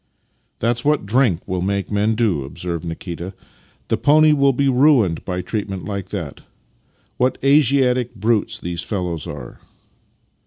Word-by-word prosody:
" - - -45 0.2
That's 115 +1 0
what 150 -5 +1
drink 110 -5 +1
will 95 -2 -2
make 100 +2 -2
men 105 +2 +1
do," 105 - +1
observed 85 +5 -5
Nikita. 85 +2 -6 0.3
" - - -34
The - - +1
pony 155 +1 +5
will 140 -1 +4
be 140 +2 0
ruined 125 - +3
by 90 -1 -3
treatment 100 -4 -4
like 100 -1 -5
that. 85 -9 -6 0.8
What 125 +1 +1
Asiatic 135 -3 +3
brutes 110 +1 0
the 85 0 -5
fellows 90 -5 -3
are! - - -8
105 Hz, 150 wpm, -20 LUFS, 90-130 Hz, 0.8 s, pony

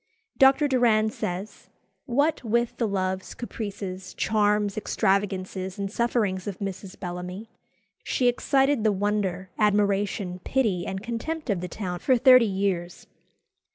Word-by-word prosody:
Dr. 270 +2 +6
Doran 230 -5 +3
says, 185 +1 -5 0.4
"What 285 +4 +1
with 235 +1 0
the 230 - 0
loves, 190 -1 -2
caprices, 200 -5 -6
charms, 210 -1 +1
extravagances, 190 -2 -1
and 200 -1 -3
sufferings 215 -5 0
of 195 -3 -4
Mrs. 195 -1 -6
Bellamy, 180 +4 -6 0.5
she 250 - +1
excited 270 0 +2
the 215 - +4
wonder, 195 -2 -1
admiration, 200 -3 +1
pity, 215 -10 0
and 190 +1 -4
contempt 250 +5 -3
of 185 -4 -1
the 180 - -4
town 180 -1 -5
for 260 +5 +3
thirty 255 -1 +7
years." 190 -3 -2
205 Hz, 125 wpm, -26 LUFS, 190-235 Hz, 0.5 s, thirty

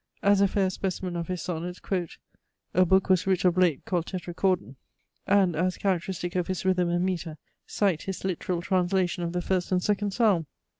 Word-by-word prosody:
As 200 -1 +4
a 200 - +5
fair 190 -1 +1
specimen 185 -1 -3
of 170 -1 -3
his 180 -1 -3
Sonnets, 175 +1 -4
quote 180 -4 -3 0.6
"A 185 0 +4
Book 190 +2 +3
was 185 -1 +2
writ 190 -1 +1
of 180 -1 +4
late 180 -6 +2
called 175 -3 -1
Tetrachordon;" 180 -4 -1 0.5
and, 195 -4 +3
as 180 +3 0
characteristic 180 -2 -2
of 180 -2 0
his 185 0 -3
rhythm 180 -2 +2
and 175 +1 +1
metre, 170 -4 -3 0.3
cite 190 -6 +1
his 190 -1 -5
literal 180 -1 -2
translation 180 -1 +1
of 170 - -2
the 175 0 -2
first 185 -1 -1
and 180 -1 +2
second 205 0 +1
Psalm! 195 -7 +2
185 Hz, 190 wpm, -27 LUFS, 175-190 Hz, 0.6 s, a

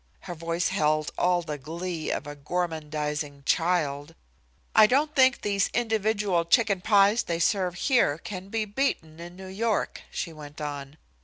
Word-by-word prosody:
Her 175 - -6
voice 170 +2 -1
held 155 0 +1
all 175 -1 +2
the 150 -2 -5
glee 165 +3 -4
of - - -2
a 145 0 -7
gormandizing 150 -2 -3
child. 160 -3 0 0.6
"I 215 -1 +8
don't 295 +6 +2
think 260 -2 +4
these 200 -1 +1
individual 215 -6 +1
chicken 200 +2 +3
pies 205 +3 +4
they 170 - -2
serve 180 +1 +1
here 205 - +2
can 190 +2 -8
be 220 0 -1
beaten 200 - -2
in 175 +1 -9
New 190 +1 -10
York," 210 +3 -1
she 170 - -4
went 150 -1 -11
on. 145 -1 -6
175 Hz, 155 wpm, -27 LUFS, 155-205 Hz, 0.6 s, I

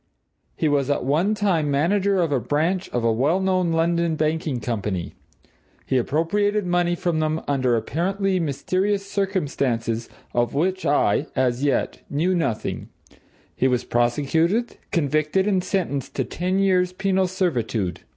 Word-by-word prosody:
He 160 - 0
was 145 -2 +1
at 145 - 0
one 165 +10 +2
time 180 -8 +1
manager 185 +6 +2
of 165 - -1
a 135 - +2
branch 160 - 0
of 120 - -2
a 115 - +3
well 145 +11 +2
known 185 -2 +1
London 170 0 +1
banking 155 -3 -1
company. 105 -6 -3 0.7
He - - -1
appropriated 195 - +1
money 175 0 +1
from 170 -2 -1
them 155 0 0
under 130 -4 +2
apparently 190 - 0
mysterious 185 +7 -1
circumstances 140 - -1 0.2
of 120 +2 0
which 185 +5 0
I, 140 -1 +2
as 130 0 +1
yet, 140 -3 0
knew 165 +6 +1
nothing; 160 -11 -2 0.7
he 130 - +2
was 125 -2 +1
prosecuted, 160 - +1
convicted, 155 +2 +1
and 190 -3 +1
sentenced 175 -8 -2
to 130 - 0
ten 180 +9 -2
years' 185 -2 +2
penal 190 0 +1
servitude. 120 - -1
160 Hz, 140 wpm, -23 LUFS, 135-185 Hz, 0.7 s, a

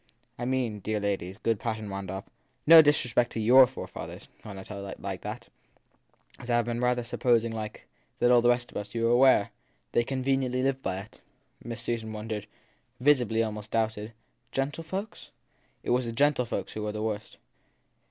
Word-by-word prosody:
I 120 - -2
mean, 125 -5 -1
dear 105 +2 -2
ladies/ 100 -2 -2
good 115 -1 0
Mr. - - -19
Patten 110 -3 -3
wound 95 -1 -5
up, 95 +3 -5 0.4
no 165 +1 +11
disrespect 125 -5 +2
to - - -3
your 125 +4 +7
forefathers 130 - -8
when 105 -3 -9
I 95 - -7
tell 100 -1 -7
you - - -7 0.3
that - - -7 0.9
as 125 - -10
I 120 0 +3
ve 120 +1 -3
rather 125 0 +1
been - - -11
suppos 120 -1 +2
ing 115 - -3
that, 115 - -5
like 110 -1 -6 0.3
all 120 0 +5
the 120 - +4
rest 120 0 +1
of - - -6
us, 105 +2 -6
you 115 - 0
were 115 - +3
aware 125 -4 +5 0.4
they 120 - +3
conven 135 +1 0
iently 130 -1 -1
lived 135 0 0
by 95 - -2
it. 105 - -16 0.4
Miss 115 -1 -5
Susan 115 -2 -3
wondered 105 -1 -5 0.5
visibly 125 -5 +3
almost 105 -1 -5
doubted. 110 -1 -1 0.4
Gentle 140 +4 -2
folks? 190 +6 -5
t - - -22 0.5
It - - -5
was 125 0 +2
the 115 - -4
gentlefolks 125 -6 +1
who 110 - -5
were 105 0 -2
the 105 0 -4
worst. 110 -1 -4
115 Hz, 195 wpm, -28 LUFS, 105-125 Hz, 0.9 s, no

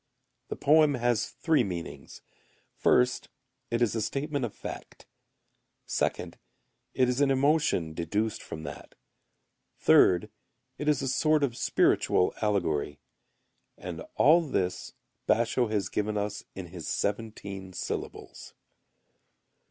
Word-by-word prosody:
The - - -4
poem 150 -1 +4
has 120 -3 +1
three 160 -6 +1
meanings. 90 -5 -7 0.5
First 125 0 +2 0.4
it 115 +1 +1
is 115 - +1
a 115 - -1
statement 140 +4 -2
of 115 - -5
fact. - - -9 0.8
Second, - - -2 0.6
it 130 - +3
is 125 +2 0
an 140 - +4
emotion 135 - +2
deduced 100 +7 -2
from 80 - -8
that. - - -9 0.8
Third, 90 -2 +4 0.5
it 150 +1 0
is 145 -2 +1
a - - -1
sort 155 +3 +2
of 125 -4 0
spiritual 90 - +2
allegory. 80 -9 0 0.8
And - - -7
all 160 +5 +6
this 90 - -2 0.3
Basho[u] 120 +1 +2
has 105 -4 0
given 105 +2 -2
us 105 0 -3
in 95 -3 -7
his - - -8
seventeen 100 -3 -3
syllables. 90 - -6
115 Hz, 120 wpm, -28 LUFS, 95-135 Hz, 0.8 s, all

